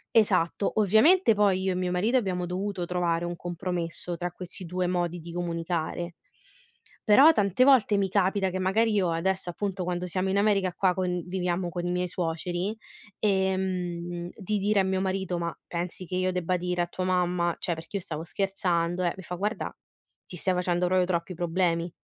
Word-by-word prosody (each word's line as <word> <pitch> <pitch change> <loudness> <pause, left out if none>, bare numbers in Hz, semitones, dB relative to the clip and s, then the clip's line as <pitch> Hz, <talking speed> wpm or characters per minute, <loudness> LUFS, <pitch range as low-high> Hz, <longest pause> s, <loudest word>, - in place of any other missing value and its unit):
Esatto. 195 -3 +3
Ovviamente 225 - +5
poi 200 -3 +2
io 190 - +1
e - - -1
mio 180 0 -1
marito 210 +8 +2
abbiamo 185 -6 -1
dovuto 185 +1 -3
trovare 175 -1 0
un 175 0 -3
compromesso 175 0 -4
tra 175 +1 -3
questi 180 +1 -7
2 180 +1 -2
modi 175 -1 -1
di 170 +1 -9
comunicare, 170 0 -3 0.9
però 270 +10 +8
tante 205 - +2
volte 255 -6 +5
mi 195 -1 +1
capita 190 0 +1
che 185 - -3
magari 215 +5 +2
io 190 -4 +2
adesso 185 +2 -1
appunto 195 +1 -3
quando 180 0 -2
siamo 185 +2 -1
in 195 - +1
America 200 -2 +2
qua 185 -2 +2
conviviamo 180 0 -2
con 175 +1 -3
i - - -1
miei 180 0 0
suoceri, 175 +4 -2 0.4
ehm, 185 -3 -1
di 210 +1 -2
dire 205 0 +3
a - - +1
mio 190 0 0
marito: 190 -2 -1
"Ma 170 0 -3
pensi 175 +1 -4
che 180 - -5
io 185 0 +1
debba 180 0 0
dire 180 0 -1
a - - -4
tua 185 +1 -4
mamma 180 -2 +1
cioè 175 - -1
perché 165 +4 -9
io 190 - -6
stavo 155 -1 -5
scherzando, 180 -2 -1
eh". 175 - +1
Mi 190 - -9
fa: 180 - -7
"Guarda, 205 +5 -3 0.5
ti 185 - -9
stai 185 +2 0
facendo 180 0 +1
proprio 185 0 +3
troppi 175 0 -2
problemi". 170 0 0
180 Hz, 185 wpm, -27 LUFS, 175-190 Hz, 0.9 s, però